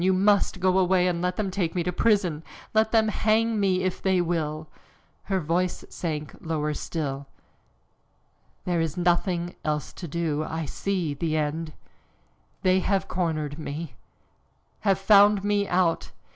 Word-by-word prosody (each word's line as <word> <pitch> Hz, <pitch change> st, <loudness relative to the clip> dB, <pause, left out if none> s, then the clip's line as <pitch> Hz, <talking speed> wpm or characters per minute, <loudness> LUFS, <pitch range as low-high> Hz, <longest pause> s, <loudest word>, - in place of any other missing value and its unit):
You 190 Hz, +1 st, +4 dB
must 195 Hz, 0 st, +2 dB
go 185 Hz, 0 st, +3 dB
away, 185 Hz, -1 st, +3 dB
and 170 Hz, -1 st, -1 dB
let 180 Hz, 0 st, 0 dB
them 200 Hz, -2 st, -2 dB
take 185 Hz, -3 st, -1 dB
me 175 Hz, -, 0 dB
to 180 Hz, +1 st, -2 dB
prison, 185 Hz, -7 st, +2 dB, 0.3 s
let 220 Hz, 0 st, +3 dB
them 220 Hz, -1 st, +3 dB
hang 220 Hz, +1 st, +1 dB
me 185 Hz, -2 st, +2 dB
if 185 Hz, -1 st, -2 dB
they 190 Hz, -1 st, +2 dB
will!" 160 Hz, -3 st, -2 dB, 0.6 s
Her 195 Hz, -2 st, 0 dB
voice 175 Hz, +2 st, -1 dB
sank 155 Hz, -4 st, -4 dB
still -, -, -11 dB, 0.6 s
lower. 140 Hz, 0 st, -4 dB, 1.4 s
"There 175 Hz, -2 st, +1 dB
is 160 Hz, -1 st, -2 dB
nothing 175 Hz, 0 st, +1 dB
else 150 Hz, -2 st, -2 dB
to 175 Hz, -, -7 dB
do 155 Hz, -1 st, -1 dB
I 160 Hz, 0 st, -4 dB
see 180 Hz, -1 st, -2 dB
the 155 Hz, +2 st, -1 dB
end. 155 Hz, +1 st, -2 dB, 0.9 s
They 185 Hz, 0 st, +4 dB
have 195 Hz, +1 st, 0 dB
cornered 155 Hz, -4 st, -2 dB
me, 155 Hz, 0 st, -5 dB, 0.9 s
have 195 Hz, -3 st, +2 dB
found 200 Hz, 0 st, +5 dB
me 205 Hz, 0 st, +1 dB
out! 175 Hz, -2 st, +1 dB
180 Hz, 150 wpm, -26 LUFS, 160-195 Hz, 1.4 s, found